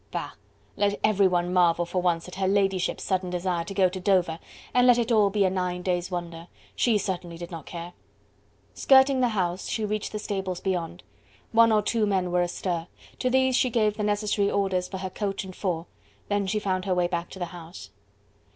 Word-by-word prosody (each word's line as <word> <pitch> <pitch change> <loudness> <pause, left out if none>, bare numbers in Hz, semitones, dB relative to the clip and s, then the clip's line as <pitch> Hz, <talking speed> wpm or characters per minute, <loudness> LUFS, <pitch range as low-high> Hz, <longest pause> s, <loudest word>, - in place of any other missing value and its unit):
Bah! - - -4 0.5
let 205 0 +1
everyone 185 -4 +2
marvel 175 -1 +3
for 180 +1 -2
once 175 -1 0
at 180 - -10
her 190 0 -1
ladyship's 195 -2 +1
sudden 185 -1 -1
desire 180 -1 -1
to 185 - -7
go 190 -1 +4
to 185 +1 -5
Dover, 180 -4 +1 0.3
and 250 0 +4
let 245 -1 +6
it 240 0 0
all 210 -3 +4
be 200 0 +2
a - - +3
nine 180 -1 -2
days' 180 -1 -1
wonder; 170 -2 -5 0.3
she 230 -4 +3
certainly 175 -4 -4
did 175 +1 -8
not 165 -4 -8
care. 170 0 -7 0.8
Skirting 265 - +5
the 250 - +3
house, 185 -5 -2
she 220 - -1
reached 210 0 -3
the 215 - -3
stables 190 -4 -3
beyond. 175 -2 -3 0.5
One 230 0 +5
or 210 -1 +3
two 220 0 +1
men 185 -3 0
were 180 0 +2
astir. 175 -1 -2 0.3
To 255 - +1
these 260 0 +3
she 255 - +3
gave 215 -3 +1
the 215 - -4
necessary 205 -1 +1
orders 190 -3 0
for 190 - -6
her 190 0 -4
coach 195 -1 -3
and 185 -1 -9
four, 175 -4 -2 0.4
then 205 -1 0
she 215 - 0
found 190 -2 -1
her 185 -2 +1
way 180 -1 +2
back 170 0 -3
to - - -10
the 180 - -2
house. 170 0 -10
190 Hz, 205 wpm, -26 LUFS, 175-210 Hz, 0.8 s, let